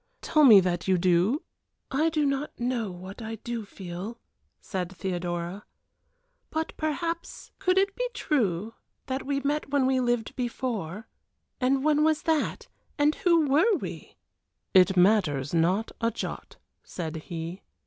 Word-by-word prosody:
Tell 305 -1 +3
me 225 -8 +10
that 175 -1 -1
you 190 -1 +4
do 185 - +2 0.2
?" - - -52
"I 305 +4 +2
do 305 -2 +1
not 275 0 -2
know 240 -3 -1
what 185 +4 -9
I 225 0 -5
do 230 0 -5
feel," 190 +4 -7 0.4
said 185 -2 -4
Theodora. 175 0 -4 0.9
"But 320 0 -2
perhaps 330 +2 -3
could 365 0 +2
it 390 +1 +2
be - - -1
true 220 - 0 0.3
that 265 +1 -4
we 280 -1 0
met 290 +1 -1
when 280 -2 +2
we 260 0 +2
lived 240 -2 0
before; 230 -6 -3 0.5
and 265 +1 +2
when 305 0 +3
was 310 -1 +2
that? 320 -2 0 0.3
and 295 +1 +4
who 335 -4 +3
were 330 +11 +4
we?" - - -8 0.6
"It 190 0 +5
matters 175 -8 +3
not 180 +7 +2
a 230 - +3
jot," 230 - -6 0.2
said 160 -2 -5
he. 165 +3 -6
230 Hz, 150 wpm, -27 LUFS, 185-290 Hz, 0.9 s, me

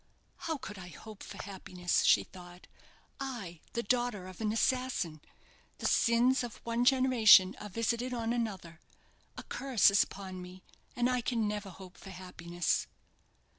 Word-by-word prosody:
"How 320 -2 -1
could 210 -7 -8
I 180 - -9
hope 210 +5 -12
for - - -9
happiness?" 185 -2 -1
she - - +5
thought; 180 -1 -13 0.5
"I, 230 - -6
the 235 - -1
daughter 240 -4 0
of 185 +3 -10
an 215 -1 0
assassin! 225 - 0 0.6
The - - -6
sins 245 +2 +3
of 240 -2 -6
one 235 +1 0
generation 245 -7 +6
are 210 - -7
visited 235 +4 -1
on 230 -1 -1
another. 195 -9 -4 0.6
A - - -6
curse 260 -7 +3
is 200 - +5
upon 190 -2 -8
me, 180 +1 -11 0.3
and 245 0 +2
I 250 -1 +1
can 230 -3 0
never 205 -1 -4
hope 185 0 -12
for 195 - -12
happiness." 175 -2 -2
210 Hz, 155 wpm, -32 LUFS, 185-245 Hz, 0.6 s, generation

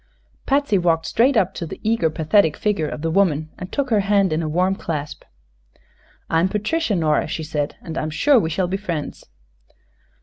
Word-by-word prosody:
Patsy 275 -8 +2
walked 165 -2 +1
straight 240 - +2
up 190 -4 +2
to 170 - -5
the - - -8
eager, 220 -7 +1
pathetic 160 +2 +2
figure 200 -7 0
of 150 - -6
the 165 - 0
woman 160 -5 +1
and 185 - -7
took 280 -3 -2
her 215 - +4
hand 200 -3 +2
in 155 - 0
a 155 - -2
warm 180 +4 +1
clasp. 150 -6 -5 1.0
"I'm 165 +3 +2
Patricia, 215 - -1
Nora," 155 -3 +1
she 160 +1 -4
said, 150 -2 -3
"and 165 -1 -4
I'm 155 - -2
sure 245 - +4
we 160 - -1
shall 180 +3 -1
be 190 +2 -2
friends." 170 -7 -5
175 Hz, 190 wpm, -21 LUFS, 160-210 Hz, 1.0 s, her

